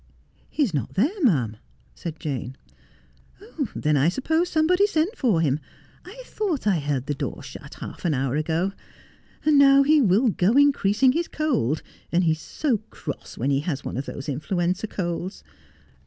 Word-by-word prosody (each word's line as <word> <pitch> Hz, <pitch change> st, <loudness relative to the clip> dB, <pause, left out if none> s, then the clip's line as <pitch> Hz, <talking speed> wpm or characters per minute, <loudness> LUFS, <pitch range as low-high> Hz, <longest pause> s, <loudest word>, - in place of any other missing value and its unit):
'He's 275 Hz, -, 0 dB
not 135 Hz, -7 st, -3 dB
there, 315 Hz, -, +1 dB
ma'am,' 130 Hz, -, +2 dB, 0.4 s
said 165 Hz, -2 st, -7 dB
Jane. 130 Hz, -3 st, -4 dB, 0.6 s
' 65 Hz, -1 st, -7 dB
Then 150 Hz, 0 st, +1 dB
I 145 Hz, +3 st, +4 dB
suppose 320 Hz, -, 0 dB
somebody 360 Hz, +6 st, +3 dB
sent 365 Hz, +3 st, 0 dB
for 220 Hz, -, +2 dB
him. 145 Hz, -2 st, +1 dB, 0.4 s
I 440 Hz, +8 st, -11 dB
thought 370 Hz, -, -2 dB
I 195 Hz, -5 st, +3 dB
heard 140 Hz, -3 st, -2 dB
the 145 Hz, -, -1 dB
door 140 Hz, -2 st, -5 dB
shut -, -, -10 dB
half -, -, -9 dB
an 160 Hz, -4 st, +1 dB
hour 135 Hz, 0 st, -1 dB
ago. 160 Hz, +5 st, 0 dB, 0.7 s
And 300 Hz, -2 st, +5 dB
now 275 Hz, 0 st, +7 dB
he 300 Hz, +1 st, +5 dB
will 225 Hz, +3 st, +4 dB
go 195 Hz, +1 st, +2 dB
increas 270 Hz, -6 st, +3 dB
ing 260 Hz, -, +8 dB
his 335 Hz, +5 st, -1 dB
cold. 250 Hz, -, 0 dB, 0.3 s
And 175 Hz, +2 st, +3 dB
he 165 Hz, -, +3 dB
is 160 Hz, -, -1 dB
so 265 Hz, -8 st, -1 dB
cross 145 Hz, -, -7 dB
when 135 Hz, +5 st, 0 dB
he 135 Hz, -, +2 dB
has 145 Hz, -2 st, -3 dB
one -, -, -4 dB
of 135 Hz, +3 st, -4 dB
those 140 Hz, -, -6 dB
influenza 175 Hz, +7 st, -1 dB
colds. 180 Hz, 0 st, -4 dB
185 Hz, 175 wpm, -24 LUFS, -, 0.7 s, ing